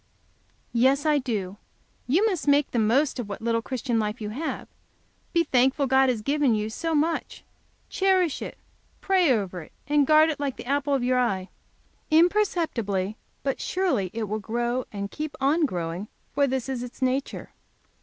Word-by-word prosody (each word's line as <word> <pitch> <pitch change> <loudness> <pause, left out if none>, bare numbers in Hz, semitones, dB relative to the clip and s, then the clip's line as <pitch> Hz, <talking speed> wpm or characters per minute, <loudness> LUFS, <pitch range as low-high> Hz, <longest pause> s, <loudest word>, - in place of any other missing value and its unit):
"Yes, 265 +5 +3
I 300 -2 +3
do. 205 -7 -3 0.5
You 340 - +3
must 370 -9 -1
make 285 0 +3
the 240 - 0
most 255 +6 +2
of 225 -4 -4
what 200 - -5
little 230 0 0
Christian 245 -1 -2
life 210 +1 -2
you 210 -2 -4
have; 305 +8 -4 0.6
be 335 -1 +3
thankful 265 0 +2
God 265 0 +4
has 230 -4 -1
given 280 -2 +2
you 215 +1 -2
so 325 +7 -2
much, 320 +3 -1 0.4
cherish 375 -5 +1
it, - - -6 0.4
pray 370 -6 +3
over 195 -6 -1
it, 155 - -14 0.2
and 290 -1 +3
guard 310 +1 +6
it 295 - -6
like 280 -3 -2
the - - -8
apple 280 +1 +1
of 265 - -1
your 250 0 +2
eye. 195 -6 0 0.6
Imperceptibly, 315 - +1 0.3
but 270 -1 -2
surely, 355 - 0
it 225 0 -3
will 215 +1 -2
grow, 240 +3 -2
and 200 -1 -5
keep 305 -1 -5
on 295 +4 +3
growing, 175 0 -4 0.3
for 280 -1 +3
this 260 -1 -2
is 260 -2 -3
its 250 +1 -6
nature." 260 +2 -2
260 Hz, 175 wpm, -25 LUFS, 220-300 Hz, 0.6 s, guard